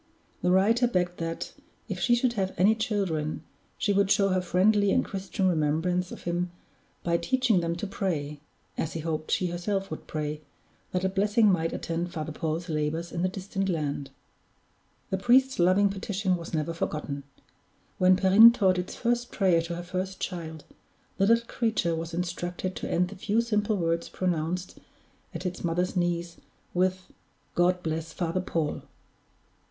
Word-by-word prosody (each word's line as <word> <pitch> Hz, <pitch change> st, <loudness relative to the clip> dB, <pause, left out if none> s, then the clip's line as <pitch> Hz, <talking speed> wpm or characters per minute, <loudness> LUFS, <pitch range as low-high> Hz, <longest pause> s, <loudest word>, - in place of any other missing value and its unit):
The 180 Hz, -, +1 dB
writer 220 Hz, +7 st, +4 dB
begged 180 Hz, -5 st, 0 dB
that, 165 Hz, 0 st, -4 dB, 0.3 s
if -, -, -4 dB
she 240 Hz, -, +4 dB
should 240 Hz, 0 st, +1 dB
have 190 Hz, -4 st, -2 dB
any 200 Hz, +4 st, +5 dB
children, 190 Hz, -9 st, -1 dB, 0.3 s
she 205 Hz, -, +1 dB
would 200 Hz, 0 st, +3 dB
show 195 Hz, 0 st, +4 dB
her 185 Hz, -1 st, +2 dB
friendly 200 Hz, +3 st, +3 dB
and -, -, +2 dB
Christian 195 Hz, 0 st, -2 dB
remembrance 175 Hz, +2 st, +1 dB
of -, -, -9 dB
him 175 Hz, +1 st, -1 dB, 0.5 s
by 170 Hz, -1 st, +2 dB
teaching 255 Hz, -3 st, +2 dB
them 170 Hz, 0 st, -1 dB
to 175 Hz, -, -4 dB
pray 155 Hz, -7 st, -3 dB, 0.4 s
(as 160 Hz, -, -2 dB
he 165 Hz, -, -3 dB
hoped 155 Hz, -1 st, -3 dB
she 180 Hz, -2 st, +1 dB
herself 195 Hz, +2 st, -2 dB
would 155 Hz, -, -7 dB
pray) 150 Hz, -1 st, -3 dB, 0.5 s
that 180 Hz, 0 st, -1 dB
a -, -, +3 dB
blessing 205 Hz, +2 st, +3 dB
might 165 Hz, -2 st, +1 dB
attend 170 Hz, +1 st, -3 dB
Father 155 Hz, -1 st, -4 dB
Paul's 160 Hz, +2 st, -3 dB
labors 155 Hz, +2 st, -2 dB
in 170 Hz, -, -3 dB
the 185 Hz, -, +2 dB
distant 195 Hz, +1 st, -3 dB
land. 145 Hz, -5 st, -2 dB, 1.0 s
The 190 Hz, -, 0 dB
priest's 260 Hz, +4 st, +4 dB
loving 185 Hz, +3 st, +5 dB
petition 195 Hz, -1 st, -1 dB
was 170 Hz, -1 st, -7 dB
never 160 Hz, 0 st, -1 dB
forgotten. 150 Hz, -3 st, -3 dB, 0.8 s
When 185 Hz, 0 st, +6 dB
Perrine 195 Hz, +4 st, +8 dB
taught 190 Hz, -6 st, +2 dB
its 180 Hz, -, -5 dB
first 240 Hz, 0 st, -1 dB
prayer 185 Hz, -5 st, +3 dB
to 170 Hz, +1 st, -4 dB
her 175 Hz, -, -5 dB
first 185 Hz, +1 st, -4 dB
child, 160 Hz, -4 st, -5 dB, 0.6 s
the 195 Hz, -, +4 dB
little 230 Hz, +1 st, +4 dB
creature 220 Hz, -8 st, 0 dB
was 165 Hz, +1 st, -4 dB
instructed 175 Hz, +1 st, -3 dB
to -, -, -4 dB
end 180 Hz, +1 st, +1 dB
the 200 Hz, -, -9 dB
few 205 Hz, +3 st, 0 dB
simple 215 Hz, -2 st, +1 dB
words 170 Hz, -1 st, -1 dB
pronounced 180 Hz, 0 st, -2 dB, 0.6 s
at -, -, -5 dB
its 180 Hz, 0 st, -4 dB
mother's 175 Hz, +2 st, 0 dB
knees, 175 Hz, -1 st, -1 dB, 0.4 s
with, 185 Hz, +1 st, +1 dB, 0.5 s
"God 180 Hz, +1 st, +2 dB
bless 160 Hz, 0 st, -3 dB
Father 175 Hz, +1 st, -1 dB
Paul." 165 Hz, -4 st, -2 dB
180 Hz, 165 wpm, -27 LUFS, 165-195 Hz, 1.0 s, Perrine